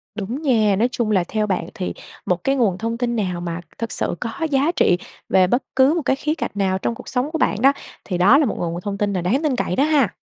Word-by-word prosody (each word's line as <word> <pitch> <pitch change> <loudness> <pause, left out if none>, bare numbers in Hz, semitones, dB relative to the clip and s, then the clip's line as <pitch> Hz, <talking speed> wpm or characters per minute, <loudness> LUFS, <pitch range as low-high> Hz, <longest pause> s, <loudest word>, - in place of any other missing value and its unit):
Đúng 220 +7 -4
nha, 220 -9 +3
nói 220 +5 +2
chung 235 -3 -1
là 190 -4 +3
theo 215 -1 -1
bạn 190 - -1
thì 190 -5 -4 0.3
một 180 -1 -1
cái 270 - +2
nguồn 215 -9 +1
thông 230 +3 -3
tin 240 -1 -1
nào 180 -5 -2
mà 170 0 -4 0.2
thực 230 -1 -4
sự - - -2
có 230 - -3 0.2
giá 280 +4 +2
trị 180 - +3 0.3
về 185 -1 +4
bất 245 +8 +1
cứ 265 +3 +5
một 340 - 0
cái 265 - +1
khía 300 +3 -1
cạnh - - -3
nào 195 -2 0
trong 230 +4 -2
cuộc - - -12
sống 255 +3 -1
của 320 - -1
bạn 220 - 0
đó, 275 +2 +6 0.3
thì 180 - -2
đó 195 +10 +6
là 300 - +3
một 225 - -2
nguồn 170 0 -3
thông 200 +1 -4
tin 205 0 0
là 185 - -1
đáng 225 - 0
tin 295 -4 +1
cậy 185 - -1
đó 275 - +3
ha? 295 -8 +3
225 Hz, 275 wpm, -21 LUFS, 190-265 Hz, 0.3 s, đó